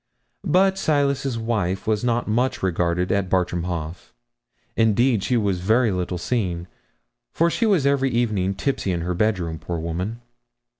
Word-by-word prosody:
But 190 +1 +3
Silas's 140 -5 +1
wife 105 -5 -1
was 110 0 0
not 120 -1 0
much 120 +3 0
regarded 90 0 0
at 100 -2 0
Bartram 90 -2 0
Haugh. 85 -3 -3 0.8
Indeed, 115 +1 +3
she 125 - +1
was 100 -5 0
very 110 +5 +2
little 90 -1 -2
seen, 90 -4 -2 0.6
for 170 +1 +2
she 230 - +1
was 185 -10 +3
every 140 -1 +2
evening 105 -6 0
tipsy 100 -3 -1
in 85 -2 -1
her 90 +2 -2
bedroom, 90 -5 -1
poor 85 - -4
woman!' 90 +8 -4
105 Hz, 150 wpm, -23 LUFS, 90-125 Hz, 0.8 s, But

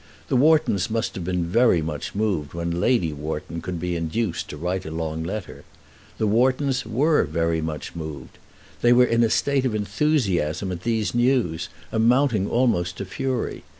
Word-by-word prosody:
The - - +1
Whartons 145 - +3
must 115 0 -1
have 90 - -5
been 90 -1 -1
very 115 +1 +3
much 75 0 -4
moved 95 -9 -1
when 85 0 -2
Lady 90 -11 +2
Wharton 75 +3 -5
could 90 -2 -4
be 90 +1 -2
induced 85 +4 -2
to 75 - -7
write 90 +4 -2
a - - -6
long 80 0 -3
letter. 95 +3 -6 0.5
The 110 - 0
Whartons 130 +4 +1
were 145 +7 +3
very 85 -1 0
much 80 -1 -5
moved. 75 -5 -8 0.4
They 120 0 +5
were 125 +1 +6
in 115 -1 +2
a 115 - +3
state 140 +3 +1
of 125 -5 0
enthusiasm 100 - 0
at 85 -1 -5
these 110 -1 -1
news, 120 -9 +1 0.2
amounting 115 -2 +2
almost 100 -8 +1
to 100 - -4
fury. 130 +5 -3
100 Hz, 170 wpm, -24 LUFS, 85-120 Hz, 0.5 s, were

